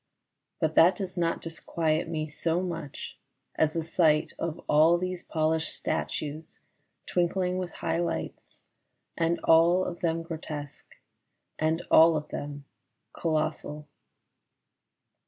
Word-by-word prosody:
But 160 -1 +1
that 175 +3 +6
does 185 -1 -5
not 170 -2 -1
disquiet 160 0 -1
me 155 -2 -2
so 165 +3 -1
much 165 -5 -6 0.3
as 155 -1 +1
the 165 - -1
sight 155 -2 +2
of 165 -2 -3
all 160 +3 +5
these 185 0 -3
polished 160 0 -1
statues 155 +2 -4 0.5
twinkling 180 +1 0
with 180 -1 -3
high 165 - -2
lights 170 -1 -4 0.5
and 170 0 +1
all 170 +3 +5
of 175 - -5
them 165 -1 0
grotesque 155 -3 -7 0.6
and 160 +2 +1
all 160 0 +7
of 150 - -6
them 145 -1 -6 0.5
colossal. 155 -2 -2
165 Hz, 120 wpm, -28 LUFS, 155-170 Hz, 0.6 s, all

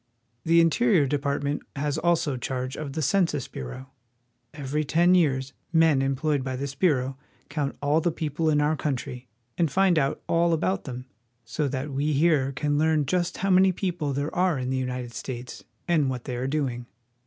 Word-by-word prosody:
The 170 +1 +5
Interior 170 0 +3
Department 140 +1 -1
has 145 +2 -1
also 165 -5 +1
charge 130 +1 -3
of 145 -3 -6
the 155 - -2
Census 150 -3 +1
Bureau. 130 - -8 0.6
Every 145 +1 -2
ten 170 +5 +3
years 135 -7 +2 0.2
men 160 -4 +4
employed 135 +1 0
by 130 0 -3
this 140 +1 -4
bureau 135 -4 +1 0.3
count 140 -1 -2
all 150 +3 +3
the 175 - +1
people 160 0 -1
in 150 -1 +3
our 150 +2 +2
country, 125 -4 -4 0.3
and 165 -3 +3
find 185 -1 +3
out 135 -1 -1
all 170 0 +2
about 185 +4 0
them, 125 -1 -6 0.4
so 150 +5 -1
that 135 +2 -3
we 145 +3 0
here 145 -2 +3
can 145 +1 0
learn 155 -1 +2
just 175 +4 -1
how 195 0 0
many 190 +1 +6
people 175 -5 -2
there 140 +3 -2
are 180 -3 +2
in 130 0 -3
the 130 - 0
United 125 -2 -4
States 125 +1 -7 0.2
and 155 -6 +2
what 125 -2 -4
they 125 - -4
are 125 +2 -2
doing. 130 -5 -2
145 Hz, 180 wpm, -26 LUFS, 130-165 Hz, 0.6 s, many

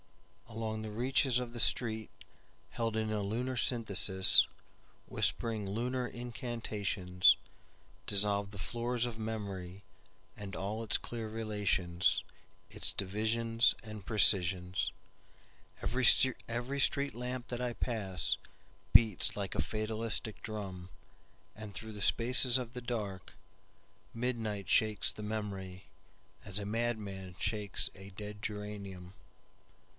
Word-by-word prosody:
Along 110 -1 -4
the 110 - -6
reaches 125 +3 +1
of 120 -1 -6
the 120 - -6
streetHeld 110 -2 +2 0.9
in 110 -1 -1
a 105 -1 -1
lunar 120 +6 -3
synthesis, 105 -6 +7 0.6
Whispering 110 -4 0
lunar 125 +4 -2
incantationsDissolve 105 -3 -1
the 100 - -11
floors 120 +4 -2
of 120 -2 -5
memoryAnd 100 -2 -8
all 105 +4 -4
its 110 - +3
clear 115 -2 -6
relationsIts 100 -5 -2
divisions 115 +4 +1
and 110 -2 -9
precisions, 95 -4 +3 0.9
Every 125 +1 +2
street 140 0 0
lamp 125 +1 -5
that 120 0 -4
I 125 -1 -2
passBeats 105 -1 +1
like 100 -2 -3
a - - +1
fatalistic 110 0 -2
drum, 95 -4 -6 0.7
And 105 -1 -9
through 110 +5 -8
the 105 - -8
spaces 125 +4 +5
of 125 -2 -5
the 125 - -6 1.3
darkMidnight 115 -5 -3
shakes 110 0 +2
the 105 - -9
memoryAs 100 -1 -5
a 100 - -5
madman 105 -4 -3
shakes 105 -3 0
a 95 +1 -11
dead 105 +2 -9
geranium. 100 -4 -7
110 Hz, 100 wpm, -32 LUFS, 100-120 Hz, 1.3 s, synthesis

